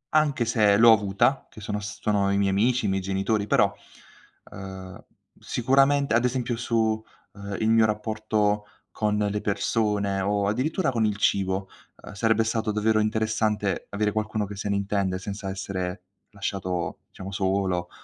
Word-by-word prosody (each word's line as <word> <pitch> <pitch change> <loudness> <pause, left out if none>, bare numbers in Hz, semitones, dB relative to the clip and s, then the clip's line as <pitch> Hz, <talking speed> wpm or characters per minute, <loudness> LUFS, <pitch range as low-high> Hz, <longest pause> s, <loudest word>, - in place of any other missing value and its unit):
anche 145 -6 +3
se 105 -3 +3
l'ho 115 +1 +8
avuta, 105 +5 +2
che - - -13
sono 105 0 -3
s 105 +1 -7
sono 100 -2 +1
i 100 - +1
miei 100 -1 +2
amici, 120 +6 +2
i - - +1
miei 95 0 0
genitori, 100 +2 -1
però, - - +3 0.8
uhm, 95 -1 -9 0.4
sicuramente 135 +2 +2
ad 120 +1 +3
esempio 125 -1 -1
su, 110 -2 0 0.3
uhm, 100 0 -6
il 110 - +1
mio 115 0 +5
rapporto 105 -1 0 0.3
con 105 -1 0
le 105 0 -1
persone, 100 -1 0
o 100 +1 0
addirittura 135 - 0
con 115 -3 +1
il 105 -1 -1
cibo, 95 -1 0 0.4
uhm, - - -10
sarebbe 110 +2 +2
stato 110 -1 -1
davvero 110 +1 +2
interessante 110 -2 0
avere 105 +1 0
qualcuno 110 0 -2
che 100 0 -8
se 100 - -4
ne 100 - +1
intende, 100 -2 -1
senza 100 +1 -6
essere 95 -1 -4 0.3
lasciato 95 -3 -3
diciamo 95 +1 -8
solo, 95 -2 -1
105 Hz, 160 wpm, -25 LUFS, 100-110 Hz, 0.8 s, l'ho